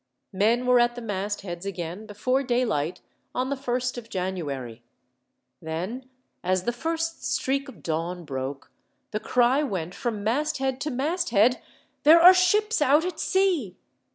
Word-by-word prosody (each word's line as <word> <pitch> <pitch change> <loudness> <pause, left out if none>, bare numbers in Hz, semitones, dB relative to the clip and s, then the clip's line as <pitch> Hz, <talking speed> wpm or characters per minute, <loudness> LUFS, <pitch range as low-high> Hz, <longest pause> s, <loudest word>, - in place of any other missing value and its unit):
Men 225 +6 +2
were 250 -1 +5
at 240 0 +2
the 245 - -6
mastheads 200 -3 -4
again, 190 +1 -5
before 255 +6 0
daylight, 230 - -1 0.3
on 260 +2 -1
the - - +1
1st 250 -2 -2
of 230 -1 -14
January. 145 - -4 0.8
Then, 185 +11 -5 0.3
as 185 0 +1
the 240 - 0
first 330 +5 -3
streak 275 +1 -1
of - - -14
dawn 170 +2 -3
broke, 135 0 -5 0.4
the 215 - -2
cry 250 +5 +2
went 180 - -3
from 220 -4 -3
masthead 265 +2 -1
to 305 - -1
masthead: 265 - +1 0.4
"There 320 +3 +8
are 360 +2 +10
ships 415 +3 +2
out 295 +4 +4
at 365 - -4
sea!" 360 - +1
240 Hz, 145 wpm, -26 LUFS, 185-275 Hz, 0.8 s, are